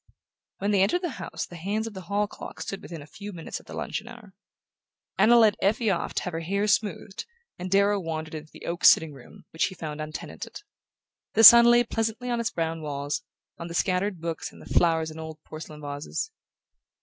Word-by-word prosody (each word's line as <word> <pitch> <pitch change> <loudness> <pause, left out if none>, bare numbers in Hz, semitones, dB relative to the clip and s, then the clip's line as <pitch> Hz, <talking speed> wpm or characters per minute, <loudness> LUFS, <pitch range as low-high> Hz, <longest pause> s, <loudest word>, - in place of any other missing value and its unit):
When 200 +1 -1
they 200 -2 +3
entered 285 - +2
the 345 - -1
house - - -4
the 175 - -12
hands 205 +6 -2
of 225 - -6
the 190 - -7
hall 205 +1 +1
clock 205 - -10
stood 195 - -5
within 165 -4 -8
a - - -13
few 205 +6 -9
minutes 165 -4 -6
of - - -21
the - - -8
luncheon - - -4
hour. 215 -5 -12 0.9
Anna 240 +2 +7
led 220 -3 +6
Effie 220 +2 +2
off 175 - -2
to - - 0
have 180 - -4
her 165 - -2
hair 200 +5 -1
smoothed 205 - -1 0.3
and 180 +1 -4
Darrow 200 +1 +3
wandered 160 -3 -5
into 155 0 -7
the - - -12
oak 170 0 -4
sitting 160 -2 +6
room, 135 -3 -15
which 160 - +1
he 190 - -5
found 155 -2 -6
untenanted. 155 - -7 0.7
The 225 - +5
sun 235 +1 +12
lay 240 0 +6
pleasantly 225 +2 -2
on 240 - 0
its 235 - 0
brown 165 -1 -3
walls, 145 -1 -3 0.4
on 170 - -5
the 170 - -7
scattered 185 +1 0
books 165 0 -4
and - - -16
the - - -13
flowers 160 -2 +3
in 160 - -9
old 160 -1 -7
porcelain 155 -1 -9
vases. 145 - -4
185 Hz, 210 wpm, -26 LUFS, 160-210 Hz, 0.9 s, sun